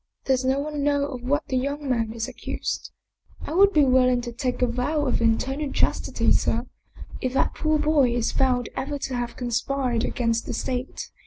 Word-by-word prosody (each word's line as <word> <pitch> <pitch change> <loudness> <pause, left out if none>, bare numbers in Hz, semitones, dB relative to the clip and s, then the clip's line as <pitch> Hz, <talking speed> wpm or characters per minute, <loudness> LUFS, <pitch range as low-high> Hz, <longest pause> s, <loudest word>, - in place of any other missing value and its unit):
" - - -48
Does 260 -1 +2
no 265 +1 +2
one 295 0 -3
know 285 -1 +2
of 255 -3 -6
what 285 +5 0
the 260 - -1
young 280 +3 -2
man 230 -4 0
is 225 0 -3
ac - - -11
cused?" - - -3 0.3
" - - -28
I - - -4
would 395 +3 +6
be 300 -6 +4
willing 255 -1 +4
to 240 0 -5
take 250 +1 -2
a - - +6
vow 255 +5 -1
of 255 - 0
eternal 265 +6 0
chastity, - - +1
sir, - - +2 0.6
if 255 -1 -1
that 270 - +1
poor 310 0 +1
boy 300 -4 +3
is 235 -2 0
found 250 -2 +1
ever 285 +2 -3
to 270 -1 -4
have 240 -1 -3
conspired 245 0 -1
against 230 -3 -1
the - - -3
State. 255 0 -4
260 Hz, 210 wpm, -25 LUFS, 245-285 Hz, 0.6 s, would